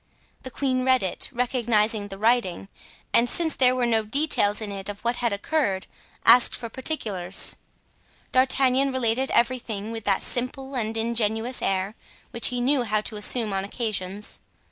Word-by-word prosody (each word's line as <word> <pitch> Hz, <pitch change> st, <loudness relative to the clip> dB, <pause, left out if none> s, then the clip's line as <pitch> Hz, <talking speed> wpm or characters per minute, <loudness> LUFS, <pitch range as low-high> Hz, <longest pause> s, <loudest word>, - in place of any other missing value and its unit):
The 260 Hz, -, -7 dB
queen 255 Hz, -1 st, -1 dB
read 260 Hz, -2 st, +3 dB
it, 185 Hz, -, -2 dB
recognized 240 Hz, -3 st, +1 dB, 0.2 s
the 195 Hz, -, -8 dB
writing, 210 Hz, -4 st, 0 dB, 0.4 s
and, 240 Hz, +1 st, +4 dB
since 325 Hz, +2 st, +1 dB
there 255 Hz, -1 st, +4 dB
were 250 Hz, -1 st, 0 dB
no 225 Hz, -2 st, +1 dB
details 215 Hz, -4 st, +2 dB
in 215 Hz, -2 st, -5 dB
it 195 Hz, 0 st, -6 dB
of 205 Hz, 0 st, -6 dB
what 235 Hz, +1 st, -1 dB
had 235 Hz, -2 st, 0 dB
occurred, 200 Hz, -2 st, -1 dB, 0.4 s
asked 240 Hz, +1 st, +6 dB
for 230 Hz, -, -7 dB
particulars. 210 Hz, -, +1 dB, 0.8 s
D'Artagnan 260 Hz, +1 st, +3 dB
related 260 Hz, 0 st, 0 dB
everything 230 Hz, -4 st, -1 dB
with 225 Hz, -2 st, -7 dB
that 195 Hz, -2 st, +1 dB
simple 265 Hz, +2 st, -3 dB
and 225 Hz, -3 st, -3 dB
ingenuous 225 Hz, +1 st, -1 dB
air 195 Hz, +1 st, -1 dB, 0.4 s
which 235 Hz, -, +2 dB
he 245 Hz, -1 st, -2 dB
knew 270 Hz, +2 st, +2 dB
how 215 Hz, -3 st, 0 dB
to 215 Hz, -, -6 dB
assume 210 Hz, 0 st, +1 dB
on 195 Hz, 0 st, -1 dB
occasions. 205 Hz, -2 st, -3 dB
235 Hz, 160 wpm, -24 LUFS, 210-255 Hz, 0.8 s, asked